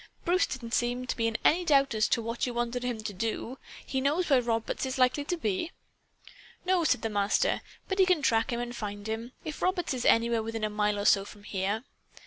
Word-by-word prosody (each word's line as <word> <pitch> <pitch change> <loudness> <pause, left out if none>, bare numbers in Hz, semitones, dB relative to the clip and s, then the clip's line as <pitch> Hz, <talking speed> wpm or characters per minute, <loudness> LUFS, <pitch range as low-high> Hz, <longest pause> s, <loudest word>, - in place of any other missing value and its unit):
"Bruce 360 +2 +3
didn't 235 -3 -6
seem 245 +1 0
to - - -2
be 230 -1 +1
in 225 0 -1
any 350 +4 +5
doubt 275 -5 +3
as 215 -1 +2
to 230 - +1
what 230 +2 -2
you 245 - -4
wanted 240 +1 -1
him 240 -3 -3
to 215 -1 -4
do. 225 +5 -3 0.3
He 265 - -1
knows 305 +6 +1
where 260 -2 +6
Roberts 230 -2 -1
is 260 0 -2
likely 255 +3 +3
to 355 - -1
be?" 285 - -1 0.9
"No," 365 -1 +3
said 255 -7 +2
the - - +1
Master. 205 - +1 0.3
"But 385 0 -2
he 380 - +6
can 355 -6 +3
track 225 -2 +2
him 235 - -1
and 240 0 -4
find 205 -2 -5
him, 225 +3 -4
if 310 - -6
Roberts 365 -5 0
is 250 -2 -3
anywhere 230 0 +4
within 225 0 -4
a 215 - 0
mile 210 0 +1
or 205 - -2
so 195 -1 +5
from 205 0 -13
here. 205 +3 -2
235 Hz, 230 wpm, -29 LUFS, 220-275 Hz, 0.9 s, where